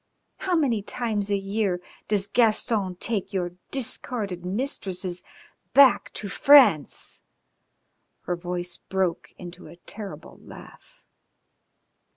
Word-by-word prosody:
How 370 Hz, -2 st, -1 dB
many 260 Hz, -10 st, +1 dB
times 210 Hz, -2 st, -3 dB
a 200 Hz, -, +2 dB
year 195 Hz, -2 st, -1 dB, 0.3 s
does 205 Hz, -2 st, +2 dB
Gaston 215 Hz, -3 st, +2 dB
take 200 Hz, +1 st, -3 dB
your 180 Hz, -2 st, -1 dB, 0.2 s
discarded 220 Hz, -7 st, -3 dB
mistresses 185 Hz, -4 st, -2 dB, 0.5 s
back 275 Hz, -2 st, +6 dB
to 205 Hz, -, -5 dB
France?" 255 Hz, -, +4 dB, 1.0 s
Her 175 Hz, -, -2 dB
voice 175 Hz, 0 st, -4 dB
broke 190 Hz, -3 st, -2 dB
into 175 Hz, -1 st, -10 dB
a 160 Hz, -, -12 dB
terrible 200 Hz, +3 st, -9 dB
laugh. -, -, -15 dB
200 Hz, 105 wpm, -25 LUFS, 180-230 Hz, 1.0 s, back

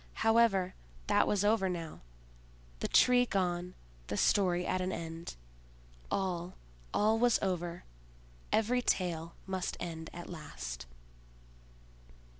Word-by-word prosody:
However, 225 Hz, -5 st, +4 dB, 0.3 s
that -, -, +3 dB
was 205 Hz, -1 st, +2 dB
over 210 Hz, -3 st, +3 dB
now—the -, -, -8 dB
Tree 245 Hz, 0 st, +5 dB
gone, 180 Hz, -2 st, -1 dB, 0.3 s
the -, -, -3 dB
story 180 Hz, -3 st, +3 dB
at 185 Hz, -, 0 dB
an 185 Hz, +1 st, -1 dB
end. 165 Hz, 0 st, -6 dB, 0.7 s
All, 180 Hz, -2 st, -2 dB, 0.4 s
all 220 Hz, +2 st, +3 dB
was 240 Hz, -1 st, +4 dB
over; 175 Hz, -2 st, -2 dB, 0.7 s
every 240 Hz, +3 st, +2 dB
tale 170 Hz, -7 st, -1 dB
must 190 Hz, -1 st, -3 dB
end 160 Hz, -2 st, -5 dB
at 175 Hz, -, -8 dB
last. 60 Hz, -, -7 dB
180 Hz, 105 wpm, -32 LUFS, 160-195 Hz, 0.7 s, Tree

